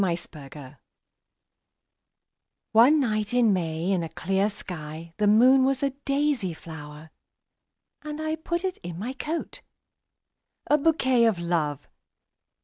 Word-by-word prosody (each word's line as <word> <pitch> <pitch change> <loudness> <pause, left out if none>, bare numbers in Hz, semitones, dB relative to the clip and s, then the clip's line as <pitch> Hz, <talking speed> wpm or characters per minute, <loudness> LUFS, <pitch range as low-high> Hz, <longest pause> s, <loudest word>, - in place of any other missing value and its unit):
My 180 -3 +1
Flower 145 -4 -11 1.9
ONE 250 +8 +6
night 215 -3 -1
in 235 -4 +4
May 165 0 -1
in 185 -3 +1
a 165 - -4
clear 195 +5 0
skyThe 170 -1 -4
moon 255 +5 +6
was 270 0 0
a 275 - +1
daisy 275 - -1
flower:And! 160 - -13 0.2
put 340 +1 -2
it 375 -1 -2
in 175 -2 -7
my 235 +8 -4
coat,A 300 0 -6
bouquet 260 -6 +3
of 220 -5 +2
Love! 160 -4 -2
205 Hz, 110 wpm, -26 LUFS, 165-265 Hz, 1.9 s, ONE